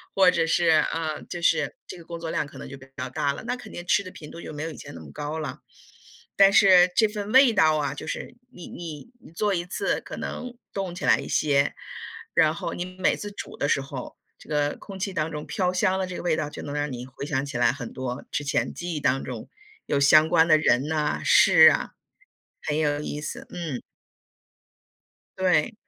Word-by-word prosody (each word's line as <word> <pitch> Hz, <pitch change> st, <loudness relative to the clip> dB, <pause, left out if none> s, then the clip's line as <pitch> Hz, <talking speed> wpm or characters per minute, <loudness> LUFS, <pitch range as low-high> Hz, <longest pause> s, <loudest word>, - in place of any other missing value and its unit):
或 190 Hz, -2 st, +6 dB
者 165 Hz, -2 st, +1 dB
是 170 Hz, +1 st, +2 dB, 0.3 s
呃， 160 Hz, -2 st, -3 dB
就 175 Hz, -, -5 dB
是 -, -, +2 dB
这 -, -, -8 dB
个 170 Hz, -, -12 dB
工 170 Hz, 0 st, -7 dB
作 165 Hz, -1 st, -5 dB
量， -, -, 0 dB
可 140 Hz, -, -13 dB
能 -, -, -8 dB
就 135 Hz, -, -9 dB
比 135 Hz, -, -14 dB
较 130 Hz, -1 st, -4 dB
大 140 Hz, +2 st, 0 dB
了， -, -, -7 dB
那 245 Hz, +1 st, -1 dB
肯 250 Hz, -, -11 dB
定 175 Hz, -, -7 dB
吃 200 Hz, -, +3 dB
的 185 Hz, -, -9 dB
频 150 Hz, -4 st, -11 dB
度， 170 Hz, -, -9 dB
就 -, -, -8 dB
没 150 Hz, 0 st, -5 dB
有 165 Hz, -, -4 dB
以 -, -, -10 dB
前 -, -, -10 dB
那 85 Hz, -, -9 dB
么 80 Hz, -3 st, -11 dB
高 150 Hz, +2 st, -4 dB
了。 155 Hz, -, -5 dB, 0.8 s
但 195 Hz, 0 st, +7 dB
是 185 Hz, -3 st, +7 dB
这 225 Hz, -, +5 dB
份 210 Hz, -1 st, -5 dB
味 260 Hz, -1 st, +7 dB
道 160 Hz, -7 st, +4 dB
啊， 145 Hz, -3 st, -1 dB
就 140 Hz, -, -8 dB
是 -, -, -5 dB, 0.2 s
你 175 Hz, -, -10 dB
你 165 Hz, +2 st, -8 dB
你 -, -, -16 dB
做 205 Hz, +3 st, 0 dB
一 175 Hz, -1 st, -1 dB
次 180 Hz, -, -1 dB
可 -, -, -9 dB
能 250 Hz, -1 st, -6 dB, 0.2 s
冻 195 Hz, -3 st, -3 dB
起 180 Hz, -, -7 dB
来 -, -, +5 dB
一 -, -, -6 dB
些， 140 Hz, -2 st, +2 dB, 0.6 s
然 155 Hz, 0 st, +4 dB
后 -, -, -4 dB
你 175 Hz, -, -4 dB
每 185 Hz, -, +2 dB
次 205 Hz, -, -6 dB
煮 205 Hz, -, -8 dB
的 145 Hz, -, 0 dB
时 140 Hz, -, +2 dB
候， 135 Hz, -2 st, -7 dB, 0.2 s
这 -, -, -17 dB
个 145 Hz, -1 st, 0 dB
空 195 Hz, -, -9 dB
气 195 Hz, +1 st, -2 dB
当 160 Hz, -3 st, -2 dB
中 150 Hz, -1 st, -5 dB
飘 180 Hz, -1 st, -1 dB
香 190 Hz, 0 st, +1 dB
的 190 Hz, -, -1 dB
这 180 Hz, -, -6 dB
个 -, -, -6 dB
味 175 Hz, -3 st, +1 dB
道， 150 Hz, -1 st, -2 dB
就 150 Hz, -, -8 dB
能 145 Hz, -, -6 dB
让 145 Hz, 0 st, -1 dB
你 125 Hz, 0 st, -6 dB
回 130 Hz, +2 st, -8 dB
想 140 Hz, -2 st, -1 dB
起 140 Hz, -3 st, -5 dB
来 120 Hz, -, +4 dB
很 120 Hz, -, -7 dB
多 130 Hz, 0 st, -5 dB
之 145 Hz, -, -2 dB
前 135 Hz, -, 0 dB
记 175 Hz, 0 st, -5 dB
忆 -, -, -2 dB
当 135 Hz, 0 st, +1 dB
中， 120 Hz, -4 st, -7 dB, 0.4 s
有 140 Hz, -, +1 dB
相 155 Hz, +3 st, +6 dB
关 165 Hz, -1 st, +5 dB
的 155 Hz, -, +6 dB
人 140 Hz, -2 st, +2 dB
呐、 150 Hz, -1 st, 0 dB
事 -, -, +8 dB
啊， -, -, -1 dB, 0.7 s
很 150 Hz, 0 st, -2 dB
有 145 Hz, -2 st, +1 dB
意 150 Hz, 0 st, -4 dB
思， -, -, -6 dB
嗯。 165 Hz, -8 st, -5 dB, 1.6 s
对。 180 Hz, -5 st, +2 dB
155 Hz, 250 characters per minute, -25 LUFS, 145-180 Hz, 1.6 s, 事